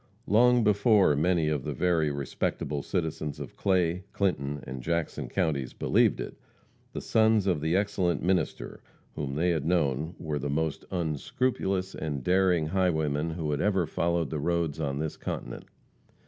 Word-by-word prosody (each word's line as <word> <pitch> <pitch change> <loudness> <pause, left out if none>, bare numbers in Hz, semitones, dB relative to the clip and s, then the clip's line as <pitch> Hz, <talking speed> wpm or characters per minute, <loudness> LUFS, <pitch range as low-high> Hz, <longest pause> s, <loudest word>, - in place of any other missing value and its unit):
Long 120 +3 +4
before 105 - +4
many 85 +1 +2
of 75 -4 -1
the 75 - -3
very 80 0 +2
respectable 70 +1 -2
citizens 80 -4 -3
of 70 -4 -8
Clay, 90 -2 +1
Clinton 75 -8 -1
and 65 0 -6
Jackson 85 +4 -2
counties 75 -9 -1
believed - - +2
it, - - -5 0.6
the - - -5
sons 110 -2 +3
of 90 -6 +1
the 80 +3 +1
excellent 95 -5 0
minister 90 -2 -1 0.3
whom 70 -2 -4
they 85 +4 +2
had 80 -4 0
known 80 -1 0
were 75 -2 -3
the 70 - -3
most 80 +1 -1
unscrupulous 95 - -1
and 75 -4 -4
daring 90 -1 +3
highwaymen 80 -3 0
who 80 -2 -3
had 75 - -1
ever 95 -3 +2
followed 85 0 -1
the 75 - -2
roads 85 -1 -1
on 70 -3 -2
this 80 +1 -3
continent. - - -5
80 Hz, 155 wpm, -28 LUFS, 75-95 Hz, 0.6 s, Long